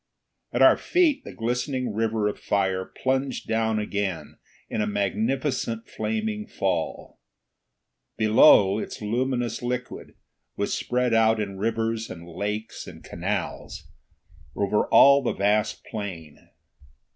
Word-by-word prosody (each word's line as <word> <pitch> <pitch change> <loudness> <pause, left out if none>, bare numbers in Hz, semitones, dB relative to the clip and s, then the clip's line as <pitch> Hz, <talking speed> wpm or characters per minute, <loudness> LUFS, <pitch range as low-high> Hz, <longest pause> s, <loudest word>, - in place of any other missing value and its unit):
At - - +2
our - - +7
feet 320 -6 +2
the - - -9
glistening 125 +1 -2
river 110 -1 0
of 105 - -3
fire 95 -2 0
plunged 130 0 -2
down 110 -1 +1
again 100 -4 -3 0.3
in - - -2
a 105 - 0
magnificent 115 +4 -1
flaming 220 -1 -3
fall. 90 -4 -3 1.0
Below, 105 -2 +6
its - - -6
luminous 120 +2 -1
liquid 125 +1 -5 0.4
was - - -2
spread 125 -1 0
out 110 0 +4
in 100 -2 -4
rivers 115 +1 -1
and 85 -1 -9
lakes 105 +5 -5
and - - -11
canals, - - -4 0.6
over 100 +1 +1
all 140 0 +7
the 130 - -1
vast 105 +2 0
plain. 90 -9 -7
110 Hz, 120 wpm, -25 LUFS, 100-125 Hz, 1.0 s, our